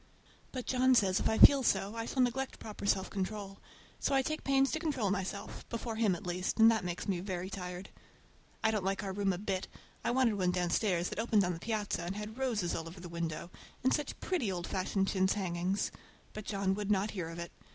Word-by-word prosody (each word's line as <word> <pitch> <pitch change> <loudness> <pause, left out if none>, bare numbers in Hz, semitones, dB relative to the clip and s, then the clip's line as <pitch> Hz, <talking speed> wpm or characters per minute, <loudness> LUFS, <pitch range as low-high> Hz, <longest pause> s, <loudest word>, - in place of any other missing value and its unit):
But 255 -2 -4
John 260 0 +4
says 190 -5 +4
if - - +1
I 220 - +1
feel 280 -1 +9
so 195 -4 +1
I 230 0 -3
shall 260 - +2
neglect 260 +2 -1
proper 210 -2 -6
self 190 -1 +1
control; 195 0 -4 0.4
so 275 - +1
I 270 - +4
take 310 +3 -3
pains 275 0 +3
to 315 - -1
control 275 - 0
myself,—before 210 +4 -4
him, 215 -5 +3
at 175 - -9
least,—and 185 +6 +4
that 220 -4 0
makes 175 -1 -4
me 190 -3 0
very 185 0 -4
tired. 180 0 -6 0.7
I 220 - +4
don't 210 -3 -1
like 195 +2 -1
our 195 -1 -3
room 200 0 +1
a 180 - -2
bit. 190 -1 -2 0.4
I - - +1
wanted 240 -4 +2
one 180 -1 +2
downstairs 180 0 +1
that - - -5
opened 225 -3 +3
on 180 0 0
the 165 - -6
piazza 215 -2 -2
and 175 +3 -4
had 210 +3 -6
roses 220 -10 0
all 165 - -3
over 170 +2 -9
the 175 0 -8
window, 170 0 -4 0.3
and 260 - +4
such 295 -2 -2
pretty 280 - 0
old 175 -2 -3
fashioned 195 +1 0
chintz 190 -1 +2
hangings! 185 0 -1 0.4
but 215 -1 -7
John 195 -2 0
would 205 0 -3
not 205 +1 +2
hear 180 -5 -4
of 165 - -7
it. 170 0 -5
200 Hz, 220 wpm, -33 LUFS, 185-225 Hz, 0.7 s, feel